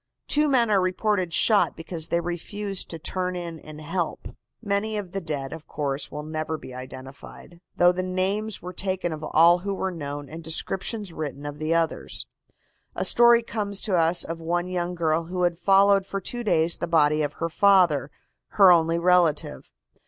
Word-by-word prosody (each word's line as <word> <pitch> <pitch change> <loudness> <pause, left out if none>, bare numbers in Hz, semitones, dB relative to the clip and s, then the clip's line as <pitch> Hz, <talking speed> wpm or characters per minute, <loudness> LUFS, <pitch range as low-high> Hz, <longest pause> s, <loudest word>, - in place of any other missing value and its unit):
Two 300 +1 +2
men 240 -5 +2
are 195 -2 +4
reported 185 0 0
shot 210 +4 +3
because 165 -1 -5
they 170 - 0
refused 195 +3 -5
to 165 - -5
turn 180 +2 -3
in 170 -2 -6
and 155 0 -11
help." 165 +2 -4 0.3
Many 210 0 -2
of 195 -4 -6
the 195 - -4
dead, 145 -4 -4
of 160 -1 -10
course, 140 -1 -3
will 150 0 -6
never 155 +1 -4
be 130 - -11
identified, 130 +6 -11
though 175 0 +5
the 180 +1 -3
names 190 +3 -2
were 180 +1 -7
taken 185 -2 -2
of 155 0 -8
all 170 +3 +5
who 200 +2 -3
were 190 0 -2
known 145 -3 -6
and 160 +3 -9
descriptions 190 +4 -2
written 145 -2 -6
of 145 0 -6
the 155 +2 0
others. 165 -1 0 0.7
A - - -2
story 235 0 +5
comes 205 -3 -3
to 205 - -2
us 170 0 +3
of 165 0 -6
one 175 +2 -2
young 180 -1 -3
girl 165 -1 0
who 180 +1 -3
had 175 -1 0
followed 195 +1 +4
for 195 - -3
two 240 +5 -5
days 170 -6 +2
the 170 - -2
body 155 -2 +3
of 145 0 -2
her 165 - -3
father, 170 -6 +3 0.4
her 195 -3 +7
only 165 -1 +3
relative. 170 - +1
175 Hz, 185 wpm, -25 LUFS, 160-195 Hz, 0.7 s, her